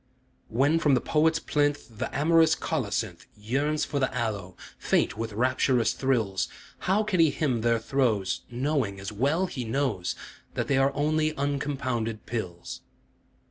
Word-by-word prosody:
When 140 +8 +3
from 145 -4 +4
the - - +3
poet's 160 +5 +2
plinth 145 -8 -1
The - - -1
amorous 160 +2 +4
colocynth 110 - -2
Yearns 140 +8 0
for 145 - -2
the 130 - +1
aloe, 100 -6 -3 0.2
faint - - +1
with 115 0 -4
rapturous 125 0 +2
thrills, 115 -8 0 0.4
How 205 +3 +4
can 205 -4 -1
he 165 -1 +6
hymn 135 -5 0
their 115 0 +3
throes 115 -5 0
Knowing, 125 -5 -1
as 95 +2 -5
well 140 - +1
he 140 -9 -4
knows, 115 -7 -1 0.4
That - - -1
they 135 -1 +2
are 135 +1 +3
only 155 +1 +1
uncompounded 135 -6 -2
pills? 90 -7 -5
130 Hz, 145 wpm, -27 LUFS, 110-150 Hz, 0.4 s, he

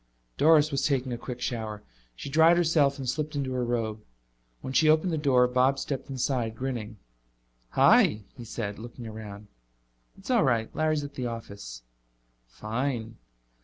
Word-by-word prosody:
Doris 155 0 +5
was 140 - -1
taking 130 -3 -1
a - - -3
quick 125 0 -7
shower. 110 -4 -4 0.3
She - - -8
dried 160 +4 +5
herself 155 -5 +3
and 135 -2 -6
slipped 150 +3 -2
into 135 -2 -2
her 125 -1 -1
robe. 115 -3 -2 0.6
When 130 - -6
she 155 +3 +4
opened 160 +3 +3
the - - 0
door 130 -4 +4
Bob 130 +2 +2
stepped 135 0 -4
inside, 125 -4 -1
grinning. 115 -4 -4 0.8
"Hi," 105 0 +5
he 125 - -9
said, 105 -3 -5
looking 120 +1 -9
around. 105 -2 -8 0.7
"It's 195 +6 -6
all 240 -3 +4
right. 115 -5 0
Larry's 155 -1 +1
at 145 - -7
the 125 -2 -3
office." 100 - -8 0.6
"Fine." 115 - -4
125 Hz, 160 wpm, -27 LUFS, 110-145 Hz, 0.8 s, Doris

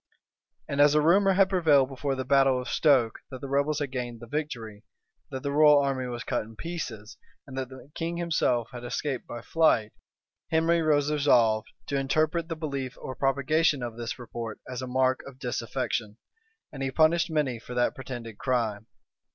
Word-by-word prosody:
And 140 0 +1
as 145 +1 +6
a - - +6
rumor 190 +6 +4
had 195 0 +5
prevailed 155 -8 +4
before 135 +1 -2
the 130 0 -4
battle 135 -1 +4
of 125 - -6
Stoke, 130 -7 +3
that 130 - -8
the 140 - -6
rebels 140 +2 +1
had 145 -3 -3
gained 120 -2 -4
the 120 - -9
victory, 115 -6 -5 0.5
that 130 -1 -6
the 140 - -1
royal 150 0 +6
army 135 -2 -1
was 120 -1 -5
cut 125 - -1
in 110 +1 -11
pieces, 120 -10 -6 0.3
and 130 - -10
that 130 -1 -3
the 130 +2 -13
king 170 +1 -3
himself 130 -9 0
had 120 -1 -8
escaped 130 +2 -3
by 120 -1 -7
flight, 120 -10 +2 0.6
Henry 165 +1 +2
was 150 -2 +2
resolved 120 -7 +3 0.2
to 140 - -1
interpret 155 +4 0
the 165 - -2
belief 140 -5 -4
or 130 - -6
propagation 140 +1 +1
of 120 -2 -5
this 120 0 -5
report 115 -2 -7
as 130 0 -5
a 130 - -5
mark 130 +1 +2
of 135 -2 -11
disaffection; 120 -3 -3 0.6
and 135 - -7
he 135 - 0
punished 165 +4 +3
many 145 -7 0
for 125 +2 -9
that 120 0 +2
pretended 120 -4 -8
crime. 115 -5 -1
135 Hz, 185 wpm, -27 LUFS, 120-150 Hz, 0.6 s, as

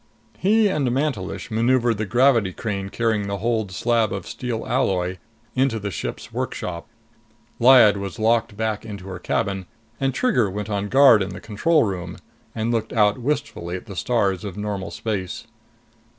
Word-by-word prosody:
He 215 +3 +4
and 150 -9 0
Mantelish 125 -7 -2
maneuvered 115 0 +2
the 110 - -2
gravity 120 -4 +3
crane 100 -2 -4
carrying 110 -2 0
the 100 0 -2
holed 110 -1 -1
slab 115 +3 +1
of 100 - -4
steel 120 -3 -4
alloy 95 -6 0 0.4
into 130 -3 +1
the 100 -1 -4
ship's - - -6
workshop. 85 -2 -4 0.7
Lyad 120 -4 +7
was 100 +2 -5
locked 115 -1 +1
back 110 -1 -2
into 100 -4 -8
her 90 -2 -6
cabin, 95 0 -2 0.3
and 135 0 +1
Trigger 125 - +1
went 105 +2 -5
on 100 0 -2
guard 135 -4 +7
in 95 - -2
the - - -7
control 150 +9 +2
room 90 -4 -4 0.4
and 115 +1 -1
looked 110 -2 -1
out 105 0 +3
wistfully 125 -10 -2
at 95 - -7
the 100 -4 -9
stars 100 -4 0
of 100 -2 -6
normal 105 -2 -3
space. 100 -4 -4
110 Hz, 165 wpm, -23 LUFS, 100-120 Hz, 0.7 s, Lyad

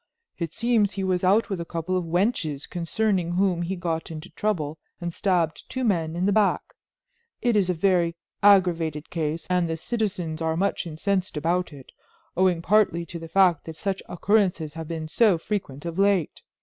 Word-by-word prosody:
It 165 -2 -4
seems 225 -4 +2
he 195 0 -3
was 185 -1 0
out 205 +4 +3
with 185 -3 -2
a - - -2
couple 170 +2 -3
of 180 -2 0
wenches 165 - 0
concerning 180 0 -1
whom 180 -1 +1
he 175 +3 -2
got 170 -3 -3
into 155 -1 -8
trouble 160 -8 -2 0.2
and 175 -1 -4
stabbed 175 -5 0
two 260 - -3
men 170 -8 0
in 175 +2 0
the 200 - +3
back. 205 -1 +1 0.7
It 240 -2 +1
is 195 -3 +2
a 180 - +1
very 170 -1 +2 0.3
aggravated 170 -6 +3
case 160 -1 -2
and 180 -2 +1
the 165 - -2
citizens 185 -6 -3
are 160 0 0
much 195 -1 0
incensed 185 +2 -1
about 175 +3 0
it, 140 -3 -13 0.4
owing 180 -2 +2
partly 185 -4 +3
to 170 0 -7
the 165 - -8
fact 180 -1 +3
that 160 - -7
such 195 +3 -2
occurrences 180 -4 +1
have 165 -1 -6
been 160 -1 -4
so 200 +2 +3
frequent 165 -6 -4
of 170 +2 -4
late. 195 -5 +2
175 Hz, 185 wpm, -25 LUFS, 165-195 Hz, 0.7 s, out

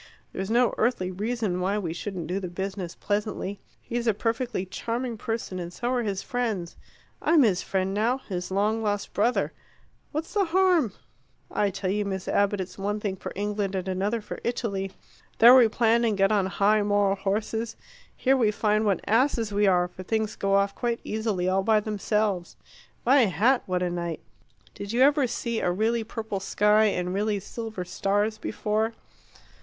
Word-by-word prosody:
There's 190 +1 -4
no 240 +1 +3
earthly 215 -6 +1
reason 210 -1 -2
why 195 +3 0
we 175 -6 -2
shouldn't 180 -1 -5
do 180 +4 -2
the 185 - -4
business 190 0 -5
pleasantly. 205 -1 -2 0.2
He's 240 0 -3
a 220 - +3
perfectly 230 -2 -1
charming 235 +5 -3
person, 220 -4 -4
and 175 -1 -5
so 240 +6 -3
are 250 -1 +1
his 200 -4 -2
friends. 220 -9 -2 0.5
I'm 315 -3 +5
his 195 -6 +2
friend 190 0 -1
now 225 +5 +1
his 185 -9 -5
long 210 +4 +1
lost 205 -2 -2
brother. 230 +5 +1 0.6
What's 315 +2 -4
the 405 -2 +2
harm? 345 - +3 0.6
I 205 - +1
tell 185 0 -2
you, 210 +1 0
Miss 190 -2 -4
Abbott, 200 0 +2
it's 190 +1 -6
one 205 +2 -1
thing 205 -2 -2
for - - -7
England 205 -1 -2
and 185 0 -3
another 200 +5 -1
for - - -7
Italy. 200 -5 -2 0.5
There 235 +3 +9
we 255 -3 +8
plan 230 +1 +2
and 220 -3 +1
get 195 +1 +3
on 200 -3 +2
high 205 +2 +3
moral 205 -1 +2
horses. 220 +3 -2 0.4
Here 265 +1 +3
we 235 -5 +3
find 215 0 +1
what 200 -3 0
asses 230 -2 +2
we 205 0 +3
are, 180 -2 +3
for 180 - -11
things 220 +2 -1
go 195 0 +1
off 200 0 +2
quite 235 -1 -2
easily, 215 -5 -1
all 190 +1 +2
by 215 +2 +3
themselves. 210 -3 -1 0.5
My 260 0 +6
hat, 220 - +3
what 180 -1 0
a 180 - 0
night! 170 -1 -3 0.5
Did 200 +2 -6
you 245 - +2
ever 285 0 +5
see 235 -1 -2
a - - 0
really 225 +5 +1
purple 220 -2 -4
sky 210 +2 +3
and 180 -3 0
really 205 +1 0
silver 215 -1 -6
stars 205 +4 0
before? 215 +2 -1
210 Hz, 180 wpm, -26 LUFS, 195-230 Hz, 0.6 s, There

